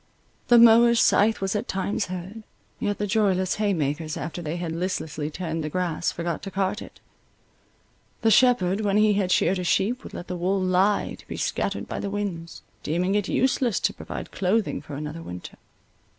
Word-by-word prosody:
The 240 - +6
mower's 235 0 +7
scythe 215 +1 +3
was 195 +1 -1
at 210 +4 -2
times 195 +2 -1
heard; 185 +4 -7 0.4
yet 205 0 -1
the 205 - -1
joyless 195 -3 +1
haymakers 160 -7 -1
after 165 +4 -5
they 160 +1 -4
had 170 -2 -4
listlessly 160 -3 -3
turned 165 0 -4
the 150 - -3
grass, 175 -1 -1
forgot 170 -1 -3
to 195 - -6
cart 195 +3 -1
it; - - -12 1.2
the 225 - +4
shepherd, 215 -5 +4
when 205 -1 +1
he 215 0 +4
had 195 -2 0
sheared 185 +2 +2
his 180 - -2
sheep, 235 - +1
would - - -10
let 175 - -6
the 180 - -4
wool 185 +3 0
lie 185 +2 +2
to - - -17
be - - -6
scattered - - -2
by - - -4
the 200 - -3
winds, 195 -5 -5 0.2
deeming 180 +5 0
it 205 -2 0
useless 255 -4 +1
to - - +1
provide - - -7
clothing 200 +3 0
for 145 - -8
another 150 +3 -6
winter. 90 - -9
190 Hz, 185 wpm, -25 LUFS, 170-210 Hz, 1.2 s, mower's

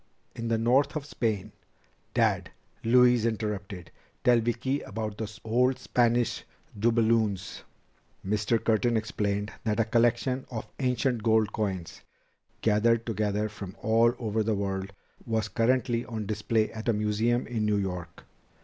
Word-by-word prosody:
"In 115 - -4
the 115 0 +1
north 125 +7 +2
of 150 -2 -3
Spain 110 -7 -2 0.3
" - - -38
"Dad," - - +2 0.3
Louise 125 0 +5
interrupted, 105 -5 -3 0.3
"tell 120 -1 +5
Vicki 120 +4 -1
about 105 0 -5
the 110 -1 -4
old 125 +3 +2
Spanish 120 -1 +1 0.4
doubloons." 110 -3 +1 0.6
Mr. 105 +3 +1
Curtin 115 +1 +2
explained 105 -1 -2
that 110 0 0
a 115 - +3
collection 120 +3 +1
of 115 -3 -5
ancient 125 -2 0
gold 110 -1 +2
coins, 95 -6 -3 0.6
gathered 115 +1 +3
together 105 -1 -1
from 100 -3 -8
all 115 +2 +4
over 110 -2 -1
the 110 0 +1
world, 95 -1 -3 0.4
was 110 -2 0
currently 120 0 +1
on 110 -2 -5
display 110 +1 0
at 110 +1 -4
a - - +4
museum 110 +3 +1
in 115 -3 -2
New 105 -1 +2
York. 90 -3 -4
110 Hz, 140 wpm, -28 LUFS, 105-120 Hz, 0.6 s, Louise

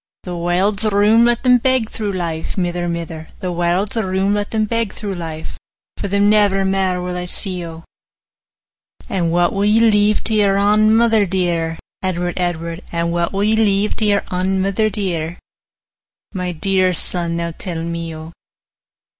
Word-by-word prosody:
'The 180 -1 -5
warld's 185 +5 0
room: 215 +2 +4
let 240 0 +1
them 250 -1 +5
beg 260 -2 +1
through 210 -2 -4
life, 165 -4 -3
45 - - -22
Mither, 175 -1 -1
mither; 165 -2 -5
The 185 - -3
warld's 175 +4 0
room: 195 -2 0
let 205 0 -1
them 220 -1 0
beg 230 -1 -1
through 205 -2 -5
life; 160 -3 -6 0.4
For - - -3
them 200 +1 +2
never 205 -2 +3
mair 190 -1 0
will 180 0 -4
I 180 0 -3
see, 180 0 -2
O.' 165 0 -10 1.3
'And 170 -4 0
what 175 0 +2
will 195 - 0
ye 210 +2 +4
leave 210 -2 +3
to 225 - +2
your 200 -2 +3
ain 215 +2 +4
mither 225 -3 +3
dear, 170 -3 -1 0.2
Edward, 180 -1 -2
Edward? 170 -1 -2
50 170 - -7
And 170 0 0
what 170 0 0
will 195 +1 -1
ye 215 +1 +3
leave 210 -1 +2
to 220 - 0
your 205 -1 +2
ain 190 +1 0
mither 200 +3 +1
dear, 175 -5 -3 1.0
My 180 -2 -3
dear 185 +2 +1
son, 170 0 +1
now 170 0 -3
tell 170 -3 -5
me, 170 -1 -4
O? 160 +1 -9
190 Hz, 180 wpm, -18 LUFS, 170-210 Hz, 1.3 s, them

